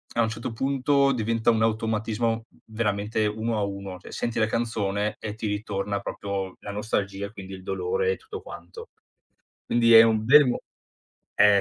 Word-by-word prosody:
a 120 Hz, -, +3 dB
un 110 Hz, -, +2 dB
certo 110 Hz, +2 st, -5 dB
punto 140 Hz, +2 st, +2 dB
diventa 115 Hz, 0 st, +1 dB
un 110 Hz, -1 st, +3 dB
automatismo 115 Hz, +1 st, 0 dB, 0.2 s
veramente 110 Hz, -1 st, -1 dB
1 110 Hz, +2 st, -1 dB
a 105 Hz, -, 0 dB
1, 100 Hz, -2 st, -5 dB
cioè -, -, -12 dB
senti 120 Hz, -, -3 dB
la 110 Hz, -, +4 dB
canzone 105 Hz, -3 st, -1 dB
e 105 Hz, -, -5 dB
ti 110 Hz, -, -4 dB
ritorna 105 Hz, -1 st, -2 dB
proprio 100 Hz, -2 st, -4 dB
la -, -, -9 dB
nostalgia, 100 Hz, -1 st, -2 dB
quindi 95 Hz, -2 st, -9 dB
il 95 Hz, 0 st, -9 dB
dolore 465 Hz, -, 0 dB
e -, -, -2 dB
tutto 435 Hz, -1 st, -9 dB
quanto. 465 Hz, 0 st, -10 dB, 0.8 s
Quindi 115 Hz, -1 st, +4 dB
è 115 Hz, -, +11 dB
un 110 Hz, -1 st, +2 dB
bel 145 Hz, +5 st, +8 dB
mo 125 Hz, -, 0 dB, 0.8 s
eh, 105 Hz, -1 st, +6 dB
110 Hz, 170 wpm, -26 LUFS, 100-115 Hz, 0.8 s, è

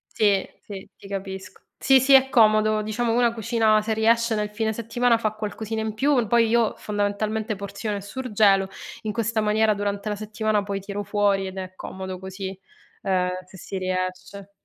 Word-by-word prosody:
Sì, 200 Hz, -3 st, +3 dB, 0.2 s
sì, 195 Hz, -2 st, -9 dB
ti -, -, -14 dB
capisco. 190 Hz, -1 st, -6 dB, 0.2 s
Sì, 270 Hz, -1 st, +5 dB
sì, 270 Hz, +2 st, +5 dB
è 265 Hz, 0 st, +7 dB
comodo, 215 Hz, -2 st, +4 dB
diciamo 225 Hz, +2 st, -1 dB
una 240 Hz, -1 st, +3 dB
cucina, 225 Hz, -1 st, +2 dB
se 220 Hz, +1 st, -1 dB
riesce 230 Hz, +1 st, +2 dB
nel 210 Hz, -1 st, -1 dB
fine 220 Hz, +1 st, -1 dB
settimana 235 Hz, +2 st, +1 dB
fa 220 Hz, -1 st, 0 dB
qualcosina 215 Hz, +1 st, -4 dB
in 220 Hz, -1 st, -3 dB
più; 265 Hz, 0 st, +2 dB
poi 230 Hz, +1 st, +3 dB
io 230 Hz, -1 st, +2 dB
fondamentalmente 210 Hz, +1 st, -2 dB
porziono 200 Hz, +1 st, -4 dB
e -, -, -4 dB
surgelo: 205 Hz, -3 st, +2 dB, 0.3 s
in 215 Hz, -, -3 dB
questa 230 Hz, 0 st, 0 dB
maniera 215 Hz, +1 st, +3 dB
durante 205 Hz, 0 st, -2 dB
la 210 Hz, -, -2 dB
settimana 215 Hz, 0 st, -1 dB
poi 200 Hz, -1 st, -3 dB
tiro 200 Hz, +1 st, -5 dB
fuori 200 Hz, -1 st, +1 dB
ed 190 Hz, 0 st, -7 dB
è 185 Hz, 0 st, -6 dB
comodo 190 Hz, -1 st, -6 dB
così, 190 Hz, 0 st, -7 dB, 0.4 s
ehm, 185 Hz, -1 st, +1 dB, 0.2 s
se 190 Hz, +1 st, -14 dB
si 190 Hz, +2 st, -6 dB
riesce. 185 Hz, +1 st, -4 dB
210 Hz, 175 wpm, -24 LUFS, 195-225 Hz, 0.4 s, è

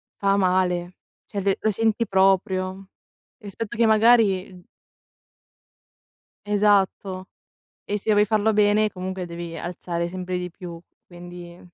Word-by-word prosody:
fa 200 Hz, 0 st, +1 dB
male, 180 Hz, -1 st, +1 dB, 0.3 s
cioè 200 Hz, -, -5 dB
l 195 Hz, 0 st, +2 dB
lo 220 Hz, -, +1 dB
senti 225 Hz, +1 st, 0 dB
proprio, 190 Hz, 0 st, +1 dB, 0.5 s
rispetto 210 Hz, 0 st, -7 dB
che 230 Hz, +1 st, +3 dB
magari 215 Hz, -5 st, +3 dB, 1.8 s
Esatto. 200 Hz, -2 st, +1 dB, 0.6 s
E 205 Hz, -, -1 dB
se 215 Hz, +2 st, -1 dB
vuoi 210 Hz, 0 st, +4 dB
farlo 215 Hz, +1 st, +2 dB
bene 210 Hz, +1 st, +3 dB
comunque 185 Hz, 0 st, -5 dB
devi 170 Hz, -1 st, -7 dB
alzare 170 Hz, -1 st, -4 dB
sempre 185 Hz, 0 st, -4 dB
di 180 Hz, -1 st, -5 dB
più, 175 Hz, -1 st, -9 dB, 0.3 s
quindi 175 Hz, 0 st, -11 dB
190 Hz, 120 wpm, -23 LUFS, 180-210 Hz, 1.8 s, vuoi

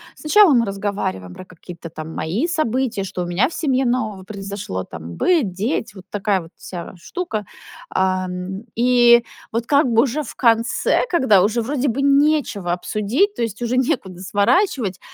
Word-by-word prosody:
Сначала 360 Hz, +2 st, +5 dB
мы 240 Hz, -2 st, +4 dB
разговариваем 195 Hz, -, -3 dB
про 185 Hz, -, -10 dB
какие-то, 175 Hz, -1 st, -11 dB
там, 160 Hz, 0 st, -8 dB
мои 195 Hz, -, -1 dB
события. 255 Hz, -, -1 dB
Что 180 Hz, -2 st, -4 dB
у -, -, -4 dB
меня 180 Hz, -, +1 dB
в -, -, -11 dB
семье 265 Hz, -4 st, 0 dB
нового 220 Hz, -6 st, -1 dB
произошло, 195 Hz, -, -5 dB
там, 85 Hz, 0 st, -9 dB
быт, 315 Hz, -, +2 dB
дети, 220 Hz, -, -2 dB
вот 190 Hz, -1 st, -12 dB
такая 200 Hz, -2 st, 0 dB
вот 165 Hz, -, -13 dB
вся 175 Hz, -2 st, -8 dB
штука. 215 Hz, -, -4 dB, 0.4 s
Ам, 185 Hz, +1 st, -2 dB
и 240 Hz, 0 st, +5 dB, 0.3 s
вот 230 Hz, +1 st, -2 dB
как 285 Hz, +2 st, +3 dB
бы 230 Hz, 0 st, +4 dB
уже 280 Hz, +3 st, -1 dB
в 280 Hz, -, -8 dB
конце, 230 Hz, -1 st, +2 dB
когда 260 Hz, -, +4 dB
уже 220 Hz, +4 st, +1 dB
вроде 275 Hz, +3 st, -1 dB
бы 265 Hz, +3 st, 0 dB
нечего 280 Hz, -, +2 dB
обсудить, 215 Hz, -, 0 dB
то 240 Hz, -, -6 dB
есть 220 Hz, -3 st, -2 dB
уже 240 Hz, +1 st, -1 dB
некуда 240 Hz, -, -1 dB
сворачивать, 205 Hz, -, +1 dB
220 Hz, 165 wpm, -20 LUFS, 185-260 Hz, 0.4 s, Сначала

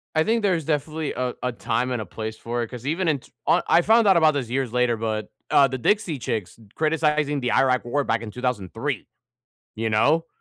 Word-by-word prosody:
I 155 Hz, -, +4 dB
think 225 Hz, +3 st, +1 dB
there's 180 Hz, -6 st, +1 dB
definitely 155 Hz, 0 st, -2 dB
a 125 Hz, -1 st, -2 dB
a 125 Hz, -, 0 dB
time 125 Hz, +1 st, -1 dB
and 120 Hz, -, -1 dB
a 105 Hz, -, -5 dB
place 110 Hz, +4 st, -6 dB
for 120 Hz, 0 st, -3 dB
it, 115 Hz, -, -6 dB
'cause 125 Hz, 0 st, -9 dB
even 165 Hz, +5 st, -1 dB
in 150 Hz, -3 st, +2 dB
t -, -, -21 dB, 0.2 s
I -, -, +4 dB
I 175 Hz, -, +5 dB
found 225 Hz, +3 st, +4 dB
out 190 Hz, -3 st, +6 dB
about 155 Hz, -2 st, +5 dB
this 130 Hz, -5 st, -3 dB
years 130 Hz, -2 st, -2 dB
later, 125 Hz, -2 st, +2 dB
but, 110 Hz, -1 st, -3 dB, 0.2 s
uh, 140 Hz, -1 st, +6 dB
the 130 Hz, 0 st, -4 dB
Dixie 170 Hz, -, +1 dB
Chicks 110 Hz, -2 st, -4 dB, 0.2 s
criticizing 150 Hz, -2 st, +1 dB
the 125 Hz, -, 0 dB
Iraq 130 Hz, -2 st, +2 dB
war 145 Hz, +4 st, 0 dB
back 115 Hz, -2 st, 0 dB
in 110 Hz, -2 st, -7 dB
2003, 125 Hz, -8 st, -3 dB, 0.7 s
you 110 Hz, 0 st, -2 dB
know, 150 Hz, +10 st, +3 dB
130 Hz, 220 wpm, -24 LUFS, 115-155 Hz, 0.7 s, out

